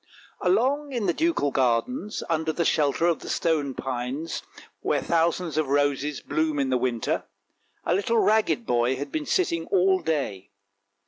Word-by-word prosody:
Along 260 +10 +1
in 235 -4 -1
the 175 - +2
ducal 325 - +1
gardens, 135 - 0
under 160 -1 0
the 170 +1 -1
shelter 150 +2 +2
of 170 -2 +2
the - - -9
stone 150 -5 0
pines, 130 +5 -3 0.4
where - - +1
thousands 165 -1 0
of 155 - 0
roses 145 +1 0
bloom 155 -1 -1
in 135 -2 0
the 130 - +3
winter, 120 -3 -1 0.6
a - - +2
little 205 +5 +1
ragged 220 +2 +2
boy 120 - +2
had 140 +1 -5
been 155 -1 -3
sitting 170 -2 0
all 190 0 +3
day. 140 - -2
160 Hz, 155 wpm, -25 LUFS, 135-185 Hz, 0.6 s, the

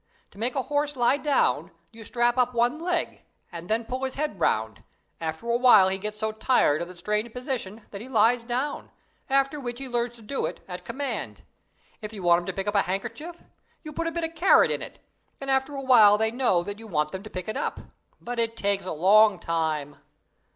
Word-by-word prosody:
To 200 - -16
make 240 +4 -1
a 265 - 0
horse 290 +1 -1
lie 245 +2 +3
down, 290 -1 +1 0.2
you 225 0 -12
strap 240 +2 +1
up 250 -1 +1
one 240 +6 +2
leg, 345 0 -2 0.3
and 170 0 -8
then 225 +1 0
pull 255 +3 -4
his 260 -1 -2
head 290 - -3
round; 110 -1 0 0.4
after 160 +7 -5
a 235 - +2
while 240 -7 +6
he 190 0 -2
gets 210 +1 -6
so 220 0 -1
tired 215 - +2
of 170 - -4
the 180 - -11
strained 210 +5 -2
position 240 -4 -5
that 200 - -7
he 250 - -9
lies 230 0 +3
down, 255 +5 -3 0.4
after 275 +2 +2
which 240 -3 -5
he 270 +1 -6
learns 240 -1 -2
to 230 - -14
do 270 +6 -2
it - - -7
at 180 -1 -7
command. 270 +4 -5 0.6
If 210 0 -7
you 200 -4 -8
want 170 0 +5
him 175 - -8
to 190 - -2
pick 195 +1 -4
up 205 - -1
a 200 - +4
handkerchief, 235 - -5 0.4
you 305 -2 -8
put 330 +2 -2
a - - -1
bit 340 0 -3
of 325 0 -3
carrot 340 +4 +5
in - - -2
it, - - -9 0.4
and 275 0 -2
after 265 +2 0
a 275 - -4
while 220 -6 +7
they 220 +1 +1
know 235 -8 +2
that 205 +3 -6
you 225 - -10
want 150 -5 -1
them 190 - -5
to 215 - -10
pick 185 0 -6
it 215 - -3
up - - -3 0.4
but 240 0 -5
it 230 0 0
takes 200 -1 -1
a 185 - -4
long 195 +5 +5
time. 160 -4 -2
230 Hz, 230 wpm, -26 LUFS, 195-265 Hz, 0.6 s, while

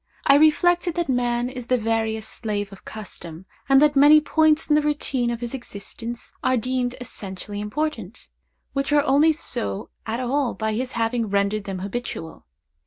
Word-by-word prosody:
I 275 - +6
reflected 345 +3 +4
that 345 -4 -1
man 245 -1 +1
is 250 -2 -7
the 255 - +3
veriest 220 -1 -1
slave 205 -3 -3
of 195 - -14
custom, 180 -5 -9 0.2
and 270 0 +7
that 295 -1 +4
many 290 +2 +8
points 315 0 +2
in 300 - +3
the 300 - +5
routine 285 -4 -1
of 235 0 -3
his 240 +1 -4
existence 235 -1 -7
are 255 0 +2
deemed 250 +1 -1
essentially 205 -4 -7
important, 230 -2 -4 0.5
which 275 +1 -1
are 290 -1 +4
only 295 +3 +4
so 100 - -4 0.2
at 225 +2 -2
all 255 +1 0
by 220 0 -2
his 255 +4 -3
having 230 -1 0
rendered 200 +1 0
them 195 -1 -4
habitual. 190 -4 -6
245 Hz, 170 wpm, -23 LUFS, 215-285 Hz, 0.5 s, many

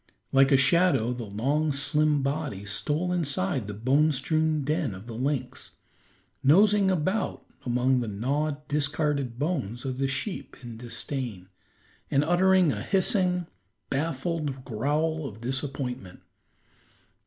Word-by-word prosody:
Like 135 +1 +5
a 135 - +7
shadow, 135 -4 +3
the 120 -2 -6
long, 140 +10 0
slim 145 +1 +2
body 140 -8 -3
stole 150 - -1
inside 135 - -1
the 105 - -5
bone 135 +8 +3
strewn 155 +2 0
den 145 -8 -1
of 95 +3 -11
the 115 - -8
lynx, 135 +4 -3 0.7
nosing 195 +7 +5
about 185 +4 -1 0.2
among 125 +2 +2
the 120 - -3
gnawed, 140 +8 -2
discarded 145 -4 0
bones 135 - -2
of 130 -1 -3
the 135 - +1
sheep 155 +9 -4
in 120 -2 -8
disdain, 115 -4 -4 0.6
and 140 +1 +3
uttering 180 0 +4
a - - -4
hissing, 185 -2 +1 0.5
baffled 145 -1 -2
growl 150 +6 -1
of 110 -3 -10
disappointment. 130 -5 -3
140 Hz, 125 wpm, -27 LUFS, 125-155 Hz, 0.7 s, a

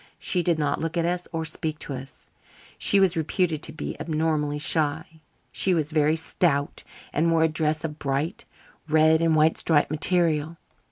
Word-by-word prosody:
She 180 - 0
did 170 -1 +1
not 145 -2 -1
look 165 +1 -3
at 165 - +1
us 175 +1 -2
or 160 -1 -3
speak 160 -1 -2
to 145 - -7
us. 130 +1 -11 0.5
She 200 - +3
was 190 -2 +3
reputed 160 0 -1
to 155 - -3
be 160 - -6
abnormally 155 -2 -1
shy. 160 +1 0 0.3
She 185 -2 +2
was 155 -1 -1
very 155 0 +2
stout 160 -3 -1 0.3
and 165 +3 +2
wore 165 -1 +3
a - - +5
dress 155 0 -1
of 155 -2 -5
bright 140 +6 -2 0.4
red 155 +1 +4
and 165 -1 +2
white 155 +1 +3
striped 150 -3 +1
material. 160 0 +1
160 Hz, 175 wpm, -25 LUFS, 150-165 Hz, 0.5 s, a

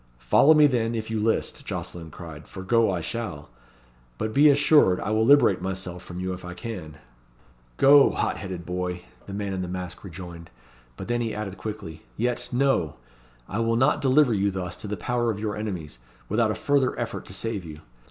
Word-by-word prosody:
"Follow 60 - +5
me, 150 -1 +7
then, 120 -4 +1
if 110 0 -4
you 110 - -1
list," 110 +1 -1
Jocelyn 85 -2 -6
cried; 80 -1 -10
"for 95 - -8
go 115 +3 +3
I 90 -3 -1
shall. 80 - -5 0.7
But 110 +8 -3
be 150 +2 +6
assured 145 -9 +5
I 105 - -3
will 110 +1 +2
liberate 130 -7 +5
myself 95 -1 -4
from 90 0 -8
you 95 0 -2
if 90 - -9
I 90 0 -7
can." 90 -6 -7 0.8
"Go, 140 0 +7
hot - - -1
headed 95 -4 -6
boy," 90 0 -3 0.2
the 100 - -7
man 100 -1 -3
in 95 - -2
the 90 - -3
mask 90 -1 -6
rejoined, 85 -3 -9 0.5
but - - -7
he 120 -1 0
then 105 - -5
added 95 -3 -5
quickly; 105 -7 -6 0.2
"yet 120 +1 -1
no! 125 - +1 0.5
I 105 - -3
will 115 0 +1
not 130 +5 +3
deliver 135 -1 +4
you 100 -1 +1
thus 90 -2 -4
to - - -7
the 105 0 -3
power 120 -1 0
of 105 -2 -2
your 105 -1 -2
enemies, 90 - -5 0.3
without 110 +1 +2
a 110 - -1
further 140 -2 +1
effort - - -4
to - - -9
save 115 -4 -3
you. 75 -2 -10
105 Hz, 200 wpm, -25 LUFS, 90-115 Hz, 0.8 s, me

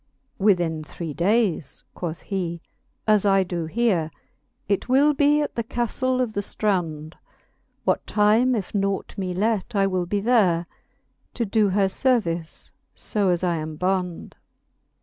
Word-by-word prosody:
IV. 195 - -2
Within 170 -6 +2
three 160 0 -6
daies, 190 - 0
quoth 170 -2 -5
fhe, 175 -3 -2 0.5
as 215 -2 +4
I 195 -1 +4
do 175 -3 -4
here, 190 -5 +1 0.6
It 200 +4 -1
will 285 +4 +5
be 295 +1 +3
at 295 - -3
the 230 - -2
caftle 245 +3 -1
of 245 -4 0
the 205 - -1
ftrond; 170 -7 -2 0.7
What - - 0
time, 220 +5 +3
if 200 -5 -4
naught 195 -1 -1
me 185 -3 -3
let, 215 +2 0
I 195 -1 +3
will 185 -2 -1
be 205 +3 0
there 200 -7 +3 0.7
To 235 - 0
do 210 0 +2
her 195 +1 +2
iervice, 190 -7 -1 0.2
fo 205 -3 0
as 175 0 +1
I 175 -2 +1
am 155 0 -5
bond. 180 0 -2
195 Hz, 150 wpm, -24 LUFS, 175-220 Hz, 0.7 s, will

